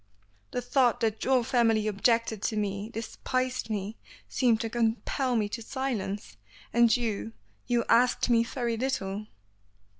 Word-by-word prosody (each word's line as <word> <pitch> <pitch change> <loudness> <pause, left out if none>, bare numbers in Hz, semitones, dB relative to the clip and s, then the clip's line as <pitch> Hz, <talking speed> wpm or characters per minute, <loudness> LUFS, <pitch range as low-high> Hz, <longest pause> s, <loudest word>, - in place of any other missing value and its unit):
The 245 - -3
thought 255 -4 +2
that 220 -1 0
your 260 -2 +3
family 225 -3 +2
objected 220 +1 +1
to 215 - -1
me, 205 0 -2
despised 255 +2 -3
me, 210 +1 -3 0.3
seemed 240 -4 +2
to 225 - -2
compel 240 +3 0
me 215 -2 +1
to 230 - -5
silence. 220 - -4 0.4
And 235 0 +5
you 210 - -3 0.3
you 240 -1 +1
asked 245 +2 +4
me 230 -2 +4
very 235 -1 -2
little." 215 -5 -2
230 Hz, 140 wpm, -28 LUFS, 215-245 Hz, 0.4 s, And